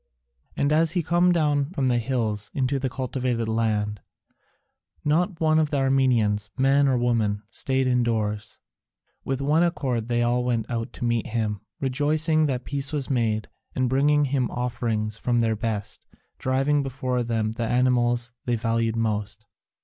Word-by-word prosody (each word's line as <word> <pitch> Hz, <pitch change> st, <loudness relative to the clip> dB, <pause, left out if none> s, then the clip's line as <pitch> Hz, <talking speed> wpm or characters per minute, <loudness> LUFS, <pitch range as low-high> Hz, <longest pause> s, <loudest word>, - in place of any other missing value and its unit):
And 145 Hz, +1 st, +2 dB
as 160 Hz, +1 st, +3 dB
he 175 Hz, -2 st, 0 dB
come 175 Hz, +3 st, +3 dB
down 150 Hz, -4 st, +1 dB
from 135 Hz, -7 st, 0 dB
the 120 Hz, -1 st, +2 dB
hills 110 Hz, -4 st, -2 dB
into 135 Hz, 0 st, 0 dB
the 130 Hz, 0 st, -1 dB
cultivated 125 Hz, -2 st, -2 dB
land, 105 Hz, -2 st, -1 dB, 1.0 s
not 170 Hz, +4 st, +1 dB
one 155 Hz, -1 st, +3 dB
of 155 Hz, -2 st, +1 dB
the 145 Hz, -, -1 dB
Armenians, 125 Hz, -6 st, +2 dB
man 140 Hz, +1 st, +4 dB
or 130 Hz, -2 st, +2 dB
woman, 110 Hz, -4 st, 0 dB
stayed 130 Hz, 0 st, 0 dB
indoors: 110 Hz, -4 st, 0 dB, 0.7 s
with 135 Hz, 0 st, -2 dB
one 150 Hz, +4 st, +3 dB
accord 130 Hz, -10 st, 0 dB
they 120 Hz, 0 st, +1 dB
all 120 Hz, +1 st, +1 dB
went 120 Hz, -3 st, -1 dB
out 115 Hz, -1 st, -3 dB
to -, -, -4 dB
meet 120 Hz, 0 st, 0 dB
him, 110 Hz, -4 st, -2 dB, 0.2 s
rejoicing 150 Hz, +4 st, +1 dB
that 130 Hz, -3 st, -2 dB
peace 140 Hz, 0 st, -2 dB
was 145 Hz, -3 st, -1 dB
made, 110 Hz, -4 st, 0 dB, 0.3 s
and 130 Hz, -1 st, +1 dB
bringing 145 Hz, +3 st, +3 dB
him 130 Hz, -3 st, 0 dB
offerings 115 Hz, -3 st, -2 dB
from 120 Hz, -1 st, +1 dB
their 115 Hz, -1 st, +1 dB
best, 110 Hz, -1 st, -4 dB, 0.3 s
driving 135 Hz, +3 st, +1 dB
before 130 Hz, -2 st, -2 dB
them 115 Hz, -2 st, -1 dB
the 115 Hz, 0 st, -3 dB
animals 120 Hz, -1 st, +1 dB
they 120 Hz, -, +1 dB
valued 115 Hz, 0 st, 0 dB
most. 105 Hz, -1 st, -2 dB
125 Hz, 155 wpm, -25 LUFS, 115-140 Hz, 1.0 s, man